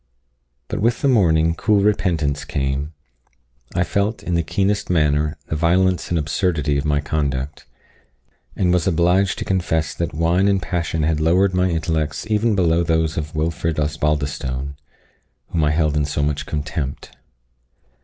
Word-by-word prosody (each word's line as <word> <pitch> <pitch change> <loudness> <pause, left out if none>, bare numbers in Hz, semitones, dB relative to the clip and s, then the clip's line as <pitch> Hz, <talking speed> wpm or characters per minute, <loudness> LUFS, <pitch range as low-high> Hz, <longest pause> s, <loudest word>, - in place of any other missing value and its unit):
But - - -3
with 115 +2 +1
the - - +4
morning 80 -10 +3
cool 105 +4 +2
repentance 85 -9 +1
came. 70 +1 -2 0.8
I 90 - +3
felt, 100 +5 -1
in 90 - -3
the 85 - +2
keenest 100 +5 -1
manner, 75 -2 +1
the 75 - -3
violence 90 +3 +2
and 85 - +1
absurdity 75 -1 0
of 70 - -4
my 75 -1 +2
conduct, 70 -2 -3 0.9
and 90 -2 +2
was 90 +1 +1
obliged 90 +3 +2
to - - -4
confess 85 -5 0
that - - -3
wine 85 +5 +2
and 100 -1 +3
passion 85 -2 -2
had 80 0 +1
lowered 90 +5 +3
my 90 0 +2
intellects 80 -2 -1
even 110 +1 +2
below 85 -3 +2
those 80 -1 +1
of 75 0 -4
Wilfred 80 0 -1
Osbaldistone, 70 -3 -2 0.7
whom 80 -3 0
I 75 - +3
held 75 -1 +1
in 75 -1 +1
so 70 0 -1
much 75 0 -2
contempt. 75 -2 -4
80 Hz, 155 wpm, -21 LUFS, 75-90 Hz, 0.9 s, the